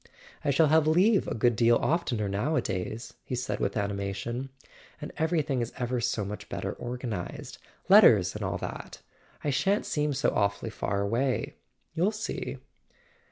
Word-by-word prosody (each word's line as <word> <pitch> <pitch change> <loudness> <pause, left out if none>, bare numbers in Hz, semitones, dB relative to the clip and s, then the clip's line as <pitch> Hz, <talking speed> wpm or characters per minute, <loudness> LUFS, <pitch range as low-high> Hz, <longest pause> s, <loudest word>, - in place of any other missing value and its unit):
"I 150 - 0
shall 150 +2 +4
have 155 0 +4
leave 185 +6 +4
a - - -2
good 120 +1 +2
deal 115 +1 +4
oftener 125 -11 0
nowadays," 110 - -2
he 125 - -4
said 125 +1 -3
with - - -1
animation. 100 +5 -3 0.5
"And - - -7
everything 155 -5 +1
is 115 - -3
ever 125 0 -1
so 115 -4 -1
much 105 +2 -7
better - - -3
organized—letters 120 -6 +2
and - - -4
all - - -1
that. - - -7 0.4
I 145 - 0
shan't 195 +9 +1
seem 150 -1 0
so 135 - +1
awfully 100 +2 0
far 100 -2 -2
away. 125 +6 0 0.4
You'll 175 +5 +2
see." 215 0 -4
125 Hz, 150 wpm, -28 LUFS, 105-150 Hz, 0.5 s, shall